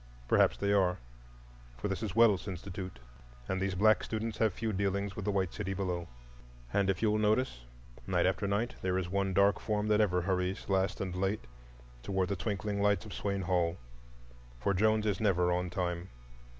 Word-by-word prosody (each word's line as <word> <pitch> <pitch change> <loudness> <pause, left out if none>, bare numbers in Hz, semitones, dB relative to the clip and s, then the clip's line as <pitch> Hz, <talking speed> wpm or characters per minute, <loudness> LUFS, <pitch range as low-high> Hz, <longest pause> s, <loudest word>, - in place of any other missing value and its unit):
Perhaps - - +4
they 100 0 +1
are; 95 -3 +3 0.8
for - - -3
this 95 +1 -3
is 105 -3 -3
Wells 110 -5 +4
Institute, 95 -2 -6 0.5
and 95 0 -1
these 95 -1 -1
black 110 +3 +4
students 110 0 -3
have 110 -2 +3
few 110 +3 -3
dealings 100 0 -1
with 105 - -5
the 105 - +1
white 95 -3 0
city 95 -2 -3
below. 90 -3 -2 0.7
And 100 -1 +2
if 95 - 0
you 110 - +4
will 105 - +1
notice, 105 - +1 0.4
night - - +2
after 100 - +1
night, 105 +5 0
there 95 0 0
is 90 -2 -2
one 100 0 0
dark 100 +2 +4
form 105 -1 -1
that 105 0 +4
ever 90 -4 +2
hurries 95 +1 -1
last 95 0 +1
and 95 -2 -3
late 95 -4 -1 0.6
toward 95 +4 -1
the 100 - 0
twinkling 100 +2 -2
lights 100 -3 +2
of - - -8
Swain 100 -1 -2
Hall,—for 60 -5 -4
Jones 110 +2 +2
is 105 0 0
never 90 -4 +3
on 90 0 0
time. 90 0 -3
95 Hz, 185 wpm, -32 LUFS, 90-105 Hz, 0.8 s, Perhaps